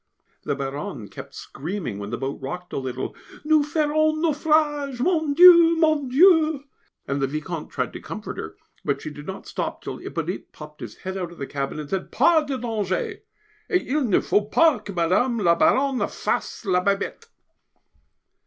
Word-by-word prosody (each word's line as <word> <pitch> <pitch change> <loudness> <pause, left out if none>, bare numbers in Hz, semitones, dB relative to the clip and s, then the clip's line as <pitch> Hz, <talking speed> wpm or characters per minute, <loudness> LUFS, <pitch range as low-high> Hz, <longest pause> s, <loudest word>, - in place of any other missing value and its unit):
The 145 - 0
Baronne 135 -5 -5
kept 95 - -10
screaming 155 - -5
when 100 0 -6
the - - -3
boat 135 +1 -4
rocked 180 +6 -6
a - - -1
little. 130 -1 -4 0.3
"Nous 310 -1 +4
ferons 310 -1 +2
naufrage! 295 -4 +1
Mon 315 -1 +1
Dieu! 340 -1 +8
Mon 310 -4 +2
Dieu!" 315 0 +5 0.4
and 140 0 -1
the 135 - +2
Vicomte 155 +3 -5
tried - - -3
to - - -8
comfort - - -7
her, - - -7 0.3
but - - -1
she 155 - -5
did 145 0 -11
not 190 - -7
stop - - -4
till - - -5
Hippolyte - - -5
popped 150 -1 -12
his 115 -4 -7
head 190 +1 -3
out 175 -2 -4
of 175 - -13
the 140 - -4
cabin 140 +2 -4
and 150 - -6
said, 190 -1 -3
"Pas 325 -2 +4
de 275 -2 -2
danger! 215 -6 -2 0.5
et 365 - +2
il 290 +3 +1
ne 205 - +3
faut 210 0 0
pas 315 -9 +4
que 205 - -7
Mme. 185 +8 +1
la 175 -6 +4
Baronne 265 +8 +2
fasse - - -3
la 180 -2 +2
Bebête!" 200 - -1
210 Hz, 180 wpm, -24 LUFS, -, 0.5 s, Dieu